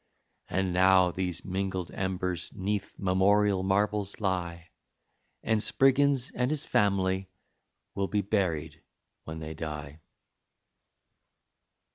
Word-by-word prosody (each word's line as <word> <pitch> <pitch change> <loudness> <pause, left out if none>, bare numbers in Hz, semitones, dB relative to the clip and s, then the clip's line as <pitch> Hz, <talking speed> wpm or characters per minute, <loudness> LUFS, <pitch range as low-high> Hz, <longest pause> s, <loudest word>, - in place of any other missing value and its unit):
And 95 0 0
now 95 0 +5
these 90 -2 -3
mingled 95 -2 -3
embers 90 -2 -2
'neath 100 +1 -3
memorial 100 +1 +3
marbles 100 +2 0
lie, 90 -4 -2 0.7
And 110 -1 +1
Spriggins 135 +1 +3
and 125 0 0
his 150 -1 -1
family 95 -2 +1 0.6
will 100 0 -1
be 105 +1 0
buried 90 -6 -1 0.4
when 80 0 -6
they 80 0 -6
die. 75 -1 -7
95 Hz, 100 wpm, -29 LUFS, 90-105 Hz, 0.7 s, now